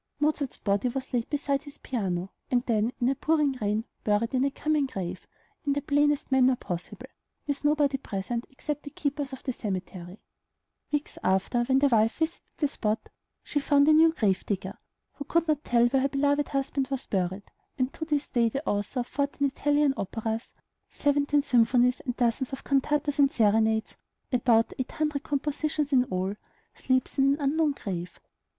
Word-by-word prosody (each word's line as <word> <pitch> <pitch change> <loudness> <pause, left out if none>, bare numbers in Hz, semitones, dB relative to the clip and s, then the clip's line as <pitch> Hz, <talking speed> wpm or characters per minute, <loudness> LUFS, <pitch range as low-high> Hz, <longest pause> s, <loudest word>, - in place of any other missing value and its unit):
Mozart's 295 -2 0
body 200 +4 0
was 260 +1 -5
laid 235 -2 0
beside 280 -2 0
his 285 -1 -12
piano, 190 -6 -3 0.2
and 245 -1 +1
then, 225 0 +1
in 240 - +2
a 270 - +3
pouring 300 +1 +2
rain, 210 +2 0 0.2
buried 210 +3 +1
in 255 0 +2
a 280 - +2
"common 300 0 0
grave," 185 -6 -5 0.4
in 285 - +1
the 285 - -1
plainest 290 -1 +1
manner 260 -1 +5
possible, 175 -7 -6 0.4
with 285 -1 -3
nobody 295 -2 +2
present 230 +5 -4
except 295 +2 -5
the 285 - -8
keepers 285 0 -3
of 265 - -9
the 260 - -2
cemetery. 185 -3 -5 0.7
Weeks 295 0 -2
after, 195 +6 +1
when 265 +2 +3
the 285 +1 +4
wife 225 -3 +3
visited 325 +1 -3
the 295 - +2
spot, 220 -5 -2 0.3
she 295 - -1
found 285 0 +4
a 310 - +7
new 320 +1 +6
grave 205 - +1
digger, 195 +2 -3 0.3
who 285 - -6
could 335 +2 +1
not 300 -1 +1
tell 240 -1 +3
where 265 +1 +2
her 275 - +1
beloved 285 +1 +1
husband 275 -1 -1
was 270 -1 -4
buried, 190 0 -1 0.3
and 255 0 0
to - - -5
this 295 -2 -1
day 235 -2 +2
the 275 +6 -5
author 205 +5 -1
of - - -5
fourteen 285 0 0
Italian 290 +1 +2
operas, 225 +3 -3 0.4
seventeen 285 0 +1
symphonies, 245 -1 +3
and 250 -2 -4
dozens 245 +1 0
of 270 - -6
cantatas 290 +1 +1
and 280 -1 +6
serenades, 220 -1 +2 0.4
about 235 -2 +3
eight 260 - -3
hundred 300 -2 -1
compositions 295 0 -1
in 250 -1 +5
all, 185 -2 -2 0.4
sleeps 260 +1 0
in 275 +1 +4
an - - -10
unknown 295 +1 +2
grave. 180 -8 -6
270 Hz, 180 wpm, -27 LUFS, 225-290 Hz, 0.7 s, a